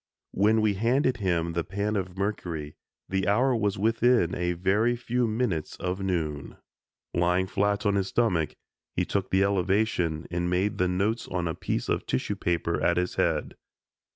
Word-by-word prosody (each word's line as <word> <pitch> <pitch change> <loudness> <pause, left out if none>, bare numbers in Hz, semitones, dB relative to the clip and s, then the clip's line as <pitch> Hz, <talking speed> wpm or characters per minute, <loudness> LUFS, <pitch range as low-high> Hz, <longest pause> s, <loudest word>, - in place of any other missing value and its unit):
When 110 +3 +3
we 105 -1 +2
handed 125 +5 +1
him 85 -5 0
the 85 0 0
pan 100 +4 -2
of 95 -2 -3
mercury 85 -7 -3 0.3
the 95 -1 -1
hour 125 +6 +3
was 105 -3 0
within 115 -2 +3
a 90 0 0
very 100 +7 +2
few 120 0 0
minutes 110 -8 -1
of 90 +1 -3
noon. 80 -7 -2 0.6
Lying 90 +2 +2
flat 100 +2 0
on 100 - +3
his 100 -1 0
stomach, 95 -9 +1 0.4
he - - +1
took 100 -1 -2
the 95 +1 +3
elevation 95 -4 +1
and 85 0 -1
made 100 +3 0
the 90 - +3
notes 100 +6 0
on 90 -2 -2
a 80 - -1
piece - - -3
of - - -1
tissue 65 - -1
paper 85 -1 -1
at 85 - +2
his 90 0 0
head. - - 0
95 Hz, 170 wpm, -27 LUFS, 90-110 Hz, 0.6 s, When